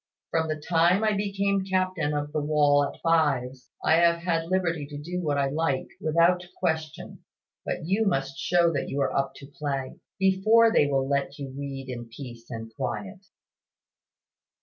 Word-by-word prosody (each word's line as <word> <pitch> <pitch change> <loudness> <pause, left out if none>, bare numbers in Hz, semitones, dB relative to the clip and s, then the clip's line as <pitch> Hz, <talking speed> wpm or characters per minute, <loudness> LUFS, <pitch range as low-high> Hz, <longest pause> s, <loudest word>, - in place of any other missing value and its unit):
From 160 -1 +1
the 155 - -1
time 170 +5 +3
I 215 -1 +3
became 200 -1 0
captain 185 -5 0
of 145 0 -3
the 155 0 -1
wall 145 -1 +3
at 140 - -5
fives, 135 -6 +1 0.2
I 160 - +5
have 170 0 +3
had 165 -2 0
liberty 170 -6 0
to 145 0 -8
do 175 +5 -4
what 150 -4 0
I 140 -1 +1
like, 145 -2 -1
without 170 +3 +3
question. 160 -4 -3 0.4
But - - -3
you 200 +5 +1
must 135 -5 -1
show 170 0 +3
that 140 - -2
you 140 - -2
are - - 0
up 135 0 0
to 140 - -11
play, 140 -2 -4 0.2
before 215 +4 +4
they 145 - +4
will 135 -1 0
let 140 0 -1
you 135 -2 -7
read 135 -1 -6
in 120 -2 -6
peace 120 -1 -10
and 115 -1 -7
quiet." 195 +8 -4
155 Hz, 170 wpm, -26 LUFS, 140-180 Hz, 0.4 s, I